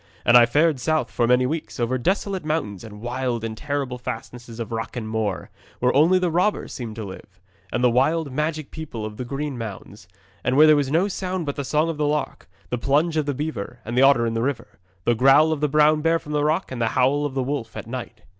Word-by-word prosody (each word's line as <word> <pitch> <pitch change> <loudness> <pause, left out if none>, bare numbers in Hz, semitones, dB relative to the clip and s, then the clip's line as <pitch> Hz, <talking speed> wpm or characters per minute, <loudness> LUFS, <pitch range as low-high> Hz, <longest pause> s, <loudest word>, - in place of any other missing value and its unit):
And 120 - +5
I 120 -1 +8
fared 150 +2 +2
south 155 +5 0
for 120 - +1
many 125 +1 +4
weeks, 155 +1 -4
over 125 +2 0
desolate 190 - -1
mountains 150 - -2
and 105 -2 -10
wild 120 -1 -2
and 110 -1 -4
terrible 140 -1 -3
fastnesses 120 0 -7
of 115 - -5
rock 115 +1 -4
and 115 -3 -4
moor, 110 -3 -3 0.3
where 125 0 +1
only 165 +6 +5
the 180 -2 0
robber 180 +6 +1
seemed 115 -4 -7
to 110 - -5
live, 95 -1 -11 0.3
and 120 - -1
the 125 - +6
wild, 140 +4 +1
magic 155 +1 -2
people 145 -9 -6
of 105 0 -7
the 125 - -4
green 140 0 -4
mounds, 110 -4 -8 0.4
and 130 +2 +1
where 155 - +8
there 155 -1 +7
was 145 -2 0
no 165 +7 +2
sound 185 -3 -3
but 145 - -3
the 140 - -3
song 150 +4 +1
of 165 -2 -3
the 150 -1 +1
lark, 150 -9 -3 0.2
the 125 - -1
plunge 150 +7 +1
of 155 -2 0
the 145 - -1
beaver 140 -6 -4
and 120 +3 -1
otter 135 -3 +5
in 115 - -1
the 115 - -1
river, 125 -5 -3 0.2
the 120 - +3
growl 135 +6 +5
of 155 -2 -2
the 150 - +2
brown 150 +1 +4
bear 165 +1 +3
from 150 - -10
the 150 -1 +1
rock, 155 +3 0
and 125 -2 -4
the 115 - +2
howl 135 +3 +3
of 145 -2 -3
the 135 - 0
wolf 125 -5 -4
at - - -6
night. 120 -2 -7
135 Hz, 240 wpm, -23 LUFS, 120-155 Hz, 0.4 s, I